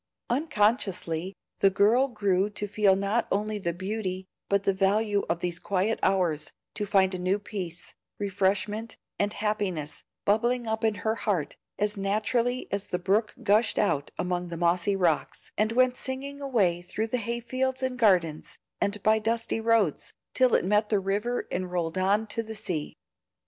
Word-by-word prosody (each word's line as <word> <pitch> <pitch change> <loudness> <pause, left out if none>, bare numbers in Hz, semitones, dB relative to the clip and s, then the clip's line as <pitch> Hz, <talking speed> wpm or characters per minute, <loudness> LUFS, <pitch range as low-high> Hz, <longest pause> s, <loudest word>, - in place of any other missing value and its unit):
Unconsciously 205 - 0 0.2
the 195 - +5
girl 215 +7 +4
grew 205 -5 +1
to 205 0 -3
feel 200 -1 +3
not 200 +4 0
only 210 +1 0
the 170 -3 -1
beauty 190 +1 -4 0.2
but 200 0 +2
the 195 - +2
value 205 +2 +2
of 170 0 -1
these 175 -1 -1
quiet 200 +3 0
hours, 170 -6 +1 0.2
to 210 -1 -3
find 195 -2 +3
a 185 - -3
new 185 +2 +1
peace, 185 -5 -6 0.2
refreshment, 205 +2 -1 0.2
and 205 0 +1
happiness, 200 -8 -2 0.2
bubbling 240 +4 +2
up 220 0 -2
in 220 -1 +2
her 220 - +3
heart 185 -10 -1 0.2
as 210 0 0
naturally 220 +5 0
as 200 0 -1
the 180 - -1
brook 200 +5 0
gushed 210 +2 +3
out 145 -9 +1
among 180 0 -2
the 170 -1 -6
mossy 175 +3 +2
rocks, 175 -5 0
and 215 +1 +1
went 255 +1 +3
singing 275 +2 -4
away 200 -11 +1
through 215 +5 -3
hayfields 250 +3 -2
and 255 -1 -2
gardens, 175 -9 +2 0.2
and 200 0 0
by 220 0 +4
dusty 225 +1 -1
roads, 225 -8 +1 0.2
till 255 -1 +4
it - - +2
met 210 +2 +2
the 210 - +3
river 205 +6 -1
and 180 0 -2
rolled 170 -2 -2
on 200 +4 +2
to 230 - -3
the 220 0 -7
sea. 165 -7 -3
205 Hz, 165 wpm, -27 LUFS, 185-225 Hz, 0.2 s, the